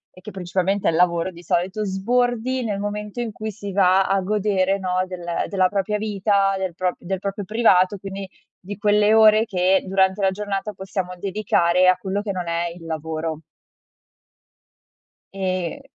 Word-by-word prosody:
e 185 - -15
che - - -9
principalmente 190 +1 -1
è - - +4
il 160 - -1
lavoro 175 0 +2
di 170 -1 -13
solito, 185 +5 -1
sbordi 245 +5 0
nel 210 -3 -2
momento 210 +2 -4
in 235 -2 -3
cui 220 +1 -5
si 205 -1 -7
va 190 0 +4
a 195 +1 +1
godere 195 -1 +1
no 185 -1 -1
del 180 -2 -8 0.2
della 185 -2 +2
propria 205 +1 -1
vita, 200 -1 +1
del 190 -3 -3
propr 180 0 -1
del 190 +2 -3
proprio 200 +1 -4
privato 205 -3 +3
quindi, 195 0 -7 0.3
di 200 +2 -8
quelle 210 +1 +3
ore 220 0 +6
che 190 -2 +2
durante 190 +1 +2
la 195 - +4
giornata 205 +1 -4
possiamo 190 -1 -4
dedicare 185 -2 +2
a 185 0 +5
quello 195 +2 -3
che 205 -1 -3
non 180 -2 -4
è 170 +1 -1
il 170 -2 -12
lavoro. 160 0 -4 1.9
E 185 -3 -3
195 Hz, 170 wpm, -22 LUFS, 185-205 Hz, 1.9 s, ore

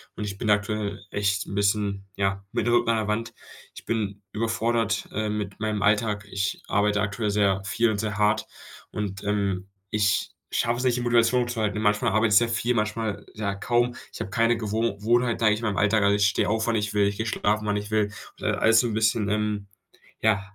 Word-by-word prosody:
und 105 - -5
ich 100 -1 -5
bin 110 - -2
aktuell 105 0 0
echt 100 0 0
'n - - -8
bisschen, 100 -1 0
ja, 95 0 -1
mit 115 - -1
dem 120 - +2
Rücken 120 -1 +3
an 115 - +3
'ner 110 - -1
Wand. 115 +2 -2 0.4
Ich - - -11
bin 105 -3 -2
überfordert, 115 0 0
äh, 110 0 -2
mit 105 -2 -4
meinem 105 -1 -1
Alltag. 105 0 +1
Ich 95 0 -2
arbeite 105 0 +2
aktuell 105 +1 -1
sehr 100 -2 +2
viel 115 +2 +2
und 100 - -2
sehr 105 -1 -2
hart 105 0 +2 0.4
und, 100 -2 -4
ähm, 100 -2 -1 0.2
ich 105 -2 +1 0.2
schaffe 120 +1 0
es 125 - -3
nicht, 125 -1 +2
die - - -2
Motivation 120 0 +3
zu 120 -2 -3
halten. 105 0 0
Manchmal 105 +2 +2
arbeite 110 +1 +2
ich - - +8
sehr 120 +1 +4
viel, 115 +1 0
manchmal, 110 -1 -2
ja, 105 -2 -2
kaum. 120 +4 +1 0.2
Ich - - -10
habe 95 - -4
keine 115 +3 +3
Gewoh 110 -1 -1
Wohnheit, 120 +1 +2
sage 110 -2 +4
ich 105 - -3
mal, 115 - 0
in - - -2
meinem - - +1
Alltag. 105 +1 +3
Also, 100 0 +4
ich 105 - +3
stehe - - +1
auf, 110 +1 0
wann 115 - +2
ich 105 -1 -1
will. 100 -1 +4
Ich 100 0 -3
gehe 110 - -2
schlafen, 105 -1 0
wann 105 - +1
ich 105 0 -5
will 110 -1 +3 0.3
und - - -16
dann - - 0
alles 115 0 +5
so 120 - +2
'n 115 - -3
bisschen, 110 -1 +2
ähm, 105 -1 -1 0.5
ja, 110 -2 +3
105 Hz, 230 wpm, -25 LUFS, 100-115 Hz, 0.5 s, ich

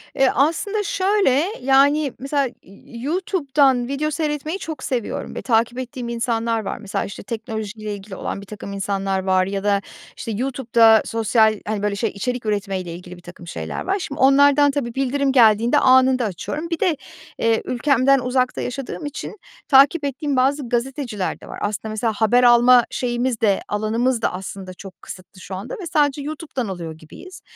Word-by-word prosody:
Eee, 270 -1 +3
aslında 395 +9 +1
şöyle, 380 -7 +2 0.2
yani, 275 +2 +3
mesela 275 -1 0 0.4
YouTube'dan 275 - 0
video 295 +3 -2
seyretmeyi 305 +4 -2
çok 315 -2 -6
seviyorum 245 -4 -3
ve - - -4
takip 235 +1 +1
ettiğim 245 -1 -6
insanlar 230 -1 -1
var. - - -3
Mesela, 210 -3 -3
işte, 200 - -8
teknolojiyle 220 -1 -5
ilgili 195 -1 -9
olan 200 - -5
birtakım 200 0 -8
insanlar 195 -1 -2
var 185 -1 +2
ya 195 0 -4
da, 200 -1 +2 0.4
işte, 225 - -5
YouTube'da 230 -2 +3
sosyal, 220 -1 +2
hani, 210 -1 -2
böyle, 205 -1 0
şey 225 +1 -1
içerik 245 +3 -4
üretmeyle 195 -4 -2
ilgili 180 0 -10
birtakım 175 0 -13
şeyler 80 - -5
var. 390 +1 0
Şimdi 295 -5 -6
onlardan 285 +1 +5
tabii, 260 -4 -3
bildirim 275 +1 0
geldiğinde 230 -2 +5
anında 260 -1 +4
açıyorum. 295 - -5
Bir 335 -2 -2
de, 345 -6 +1 0.4
eee, 230 -1 +2
ülkemden 270 +1 +3
uzakta 255 0 0
yaşadığım 270 +4 -5
için 290 +8 -6 0.3
takip 280 +3 +5
ettiğim 280 +1 -2
bazı 265 0 +1
gazeteciler 240 -4 -2
de - - -13
var. - - -8
Aslında, 210 +1 -3
mesela, 220 +1 -1
haber 240 +3 +3
alma 240 0 +6
şeyimiz 240 -1 -2
de, 200 -3 +2
alanımız 225 +4 0
da - - 0
aslında 190 0 -7
çok 190 0 -12
kısıtlı 185 0 -11
şu 185 - -7
anda 200 +6 -7
ve - - -6
sadece 290 -1 +2
YouTube'dan 295 - -5
alıyor 170 -4 -6
gibiyiz. 345 - -13
245 Hz, 165 wpm, -21 LUFS, 210-275 Hz, 0.4 s, alma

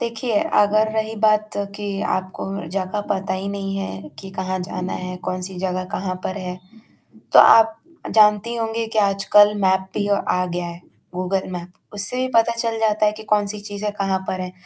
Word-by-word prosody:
देखिए, 230 -2 -1
अगर 215 +1 +3
रही 220 0 -1
बात 215 0 +3 0.3
कि 210 - -6 0.3
आपको 185 0 -4 0.3
जगह 195 +2 -2
पता 190 -1 -1
ही 190 +1 -4
नहीं 195 -1 -3
है 100 - -5
कि 195 - -9
कहाँ 185 0 -3
जाना 180 0 -4
है, 180 0 -5
कौन-सी 185 +1 -5
जगह 185 0 -2
कहाँ 185 -1 -2
पर 185 - -3
है, 180 -1 -5 0.8
तो - - +10
आप 225 -1 +7 0.4
जानती 215 +2 +5
होंगी 225 0 -2
कि - - +5
आजकल 205 +1 +4
मैप 190 0 +2
भी 205 -1 -1
आ 180 -2 +1
गया 175 0 -3
है, 170 0 -8 0.3
गूगल 185 +1 -1
मैप। 175 0 -6 0.2
उससे 250 +6 -2
पता 230 +1 +4
चल 230 -1 -1
जाता 215 -1 +2
है 210 - +3
कि - - -8
कौन-सी 210 0 +1
चीज़ें 205 +1 -3
कहाँ 195 -1 +1
पर 185 - -2
हैं, 180 0 -5
200 Hz, 180 wpm, -21 LUFS, 185-215 Hz, 0.8 s, तो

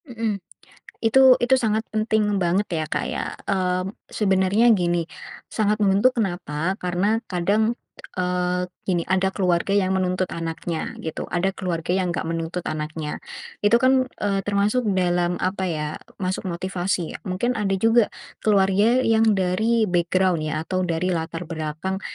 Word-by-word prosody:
Mhm. 225 -5 -3 0.6
Itu 260 +2 +7
itu 250 +2 +3
sangat 220 -1 0
penting 215 -2 +1
banget 180 +4 +2
ya, 160 -2 -1
Kak, - - -1
ya. - - -4
Mmm, 185 0 0 0.2
sebenarnya 200 +3 +3
gini, 175 -3 +1 0.5
sangat 210 -1 +1
membentuk, 205 +6 +3
kenapa? 175 -4 -1
Karena 185 +5 +1
kadang, 205 +6 +1 0.4
eee, 180 0 0 0.2
gini, 175 -3 +1
ada 190 +1 +2
keluarga 185 0 +1
yang 190 -2 +2
menuntut 185 0 0
anaknya 165 0 -4
gitu, 160 -1 -4
ada 180 +2 0
keluarga 175 -3 -3
yang 185 -1 +1
nggak 170 - -2
menuntut 165 +1 -3
anaknya. 155 0 -4 0.4
Itu 210 +3 +5
kan, 255 +1 +3
eee, 200 -1 0
termasuk 205 +4 +1
dalam 175 -1 +1
apa 190 0 -1
ya, 150 -2 -2 0.3
masuk 185 0 -3
motivasi 180 -1 -2
ya. - - -5
Mungkin 195 +7 0
ada 195 -2 +1
juga 225 +2 +4 0.3
keluarga 205 +4 +3
yang 225 -1 +4
dari 220 +5 +2
background, 180 -1 +1
ya 155 0 -2
atau 185 +1 -1
dari 170 +2 0
latar 165 +1 -3
belakang 160 +4 -4
185 Hz, 145 wpm, -23 LUFS, 175-210 Hz, 0.6 s, Itu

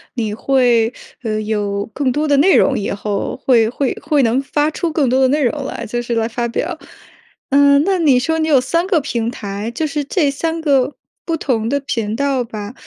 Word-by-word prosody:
你 220 -4 -2
会， 240 -1 +2 0.3
呃， 215 -3 -2
有 205 -2 -2
更 275 -3 0
多 300 +4 -1
的 290 - +3
内 350 +7 +5
容 270 - +3
以 200 - -3
后， 200 0 -3
会 230 -4 +4
会 260 +2 -1
会 295 -2 +2
能 240 +3 +2
发 295 +2 0
出 330 +1 -2
更 305 -3 +1
多 255 +2 +2
的 260 - +5
内 290 +3 +1
容 280 +3 -1
来， - - -5
就 240 +3 -3
是 240 0 -3
来 225 -1 +1
发 235 +1 -2
表。 235 - -3 0.7
嗯， 280 0 +5
那 385 -2 +1
你 285 -7 +4
说 320 +5 -1
你 315 - 0
有 290 -4 +5
3 335 +8 0
个 370 -5 +3
平 235 -5 -2
台， 205 -2 -5
就 240 +7 -3
是 295 0 -2
这 285 0 +1
3 325 +4 -2
个 280 -3 +1 0.3
不 330 -1 -2
同 230 -7 -1
的 285 +2 +1
频 225 -5 -2
道 275 -1 0
吧， 215 -2 -7
260 Hz, 220 characters per minute, -18 LUFS, 230-295 Hz, 0.7 s, 内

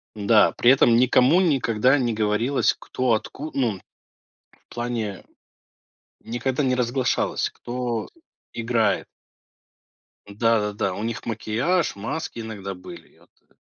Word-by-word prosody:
Да, 105 +1 +4
при 120 - +3
этом 120 -3 +5
никому 130 +7 +4
никогда 130 - +2
не 120 -3 0
говорилось, 110 +5 +1
кто 130 0 -3
отку 135 +7 -2
ну, 115 -8 0 0.9
в - - -15
плане 115 -5 -4 1.0
никогда 125 +4 -2
не 130 -1 +1
разглашалось, 125 +1 0
кто 120 -2 -4 0.4
играет. 115 -3 0 1.2
Да-да-да, 105 -2 0
у 105 - -5
них 115 +1 -4
макияж, 120 - -1
маски 115 +4 -5
иногда 100 -3 -6
были, 90 0 -12
я - - -24
тэ - - -37
115 Hz, 115 wpm, -23 LUFS, 110-130 Hz, 1.2 s, этом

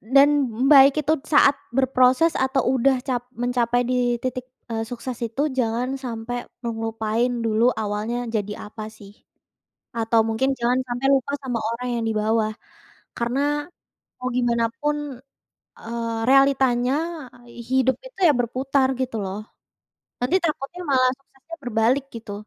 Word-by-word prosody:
Dan 275 +5 +5 0.4
baik 275 -1 +8
itu 300 - +2 0.2
saat 285 -2 +6 0.2
berproses 260 +4 +4
atau 265 0 +1
udah 260 +1 +3
cap 245 -2 -3
mencapai 245 0 +1
di 245 -1 +1
titik, 255 -1 -3 0.3
eee, 225 - -1
sukses 245 0 -6
itu 235 +5 -3 0.2
jangan 235 +1 0 0.2
sampai 240 0 -5 0.2
ngelupain 225 0 -1 0.2
dulu 225 +2 +3
awalnya 215 +4 -2
jadi 210 -1 -2 0.2
apa 215 0 -7
sih 210 -2 -14 0.9
atau 225 0 +2
mungkin 225 +5 0
jangan 245 +2 +2
sampai 245 +2 -1
lupa 275 +1 0
sama 250 -3 -2 0.2
orang 250 +2 -5
yang 230 - -2
di - - -1
bawah, 215 0 +1 0.7
karena 240 +3 -1 0.8
mau 250 - -2
gimana 235 -2 +2 0.2
pun, 295 0 0 0.8
eee, 230 0 -4
realitanya 265 -2 +4 0.4
ai 240 -1 -17 0.2
hidup 260 0 +3
itu - - -13
ya 300 - +5
berputar 260 +3 +1
gitu 255 -3 -2
loh. 190 +1 -4 0.8
Nanti 250 +9 +2
takutnya 310 +2 -3
malah 255 -1 +4
suksesnya 275 +4 -13
berbalik 245 +3 +1
gitu. 220 -3 -8
245 Hz, 135 wpm, -23 LUFS, 230-265 Hz, 0.9 s, baik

